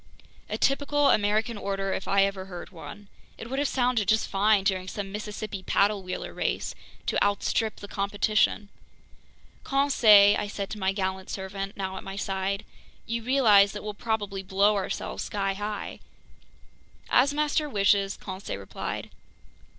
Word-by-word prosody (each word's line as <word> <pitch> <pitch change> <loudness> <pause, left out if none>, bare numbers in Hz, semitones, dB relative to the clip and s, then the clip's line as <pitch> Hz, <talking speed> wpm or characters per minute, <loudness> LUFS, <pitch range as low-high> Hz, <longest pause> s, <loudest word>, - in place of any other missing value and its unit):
A - - -2
typical 285 +1 +2
American 215 +2 +1
order 195 -1 -2
if - - -4
I 195 0 +4
ever 195 -1 -2
heard 180 -1 -9
one. 175 +4 -10 0.3
It 230 - -9
would 270 - -1
have 285 - +1
sounded 245 -6 +1
just 220 0 +2
fine 205 0 +3
during 185 -1 0
some 195 0 -5
Mississippi 210 -1 -5
paddle 200 +2 +2
wheeler 185 -1 -5
race, - - -2 0.3
to - - +1
"outstrip 205 +2 0
the 205 - -10
competition!" 205 +1 +1 0.9
"Conseil," 225 -8 +6
I 210 - -2
said 200 -1 -5
to 215 - -5
my 190 -1 +1
gallant 190 -1 -3
servant, 195 +1 -5
now 190 -1 -4
at - - -7
my 195 - -7
side, 195 0 -2 0.4
"you 230 0 -2
realize 220 -6 +5
that 210 - -6
we'll 210 0 -4
probably 205 -3 -2
blow 195 +2 +3
ourselves 195 -1 -3
skyhigh?" 205 +1 -3 1.1
"As 270 +3 +4
master 300 +1 0
wishes!" 200 -2 +2
Conseil 190 +1 -6
replied. - - -6
205 Hz, 150 wpm, -27 LUFS, 195-220 Hz, 1.1 s, Conseil